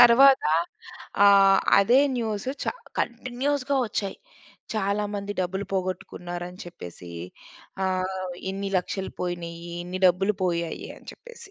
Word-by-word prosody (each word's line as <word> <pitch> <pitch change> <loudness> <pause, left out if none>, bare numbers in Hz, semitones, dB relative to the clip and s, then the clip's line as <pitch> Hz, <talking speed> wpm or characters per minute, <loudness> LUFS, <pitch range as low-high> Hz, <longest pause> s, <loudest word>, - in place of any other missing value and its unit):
తరువాత 260 +3 +8 0.8
ఆహ్, 195 -1 +7 0.2
అదే 235 +7 +5 0.2
న్యూసు 225 +1 -2
చ - - -3 0.4
కంటిన్యూస్‌గా 255 +4 -1
వచ్చాయి. 200 -2 -3 0.6
చాలా 210 0 0
మంది 200 0 -3
డబ్బులు 190 +2 -2
పోగొట్టుకున్నారని 180 -1 -4
చెప్పేసి. 90 - -10 0.8
ఆహ్, 185 0 -2 0.2
ఇన్ని 195 +1 -3
లక్షలు 190 +1 -4
పోయినాయి. 170 -1 -4
ఇన్ని 180 +1 -5
డబ్బులు 190 +4 +3
పోయాయి 170 -2 -2
అని - - -17
చెప్పేసి. 475 -4 -13
195 Hz, 110 wpm, -26 LUFS, 180-225 Hz, 0.8 s, తరువాత